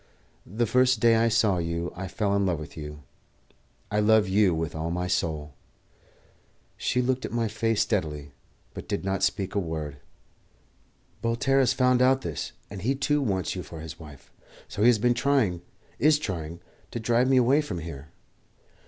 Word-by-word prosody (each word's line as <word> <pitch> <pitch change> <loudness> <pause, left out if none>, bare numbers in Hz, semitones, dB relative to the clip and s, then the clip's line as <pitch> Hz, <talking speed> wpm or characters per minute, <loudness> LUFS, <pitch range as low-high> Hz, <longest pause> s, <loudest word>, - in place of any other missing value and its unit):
The 115 +4 +1
first 125 +1 +3
day 115 +1 +5
I 115 +1 +3
saw 110 -5 +2
you 85 +1 -3
I 95 +1 -5
fell 100 +2 -1
in 100 - +2
love 90 -5 0
with 75 - -9
you; 75 -2 -8 0.9
I 105 - +1
love 110 -1 +4
you 100 +2 +4
now - - -1
with 80 0 -3
all 80 +1 -3
my 90 +1 -2
soul." 75 -4 -2 1.2
She 125 - 0
looked 130 +1 0
at - - -4
my 115 -1 0
face 115 0 0
steadily, 75 -8 -2 0.4
but - - -8
did - - -3
not 95 0 -1
speak 100 -1 0
a 100 - +1
word. 80 -5 -4 1.2
"Voltaire 120 +4 +1
has 130 -1 +3
found 125 -1 +3
out 130 +1 +4
this, 80 -4 -4 0.2
and 100 -1 -8
he 130 +7 +1
too 145 +2 +1
wants 95 - -1
you 90 - -4
for 85 -2 -10
his 80 +1 -8
wife; 75 -4 -13 0.4
so - - -5
he 115 - +6
has 120 -2 +6
been 120 +3 +2
trying 120 -9 +1 0.4
is 150 +4 +5
trying 85 - -5 0.3
to - - -5
drive 120 +3 +2
me 135 - +4
away 130 +4 +4
from 145 - -5
here. 75 -4 -7
100 Hz, 185 wpm, -26 LUFS, 85-120 Hz, 1.2 s, he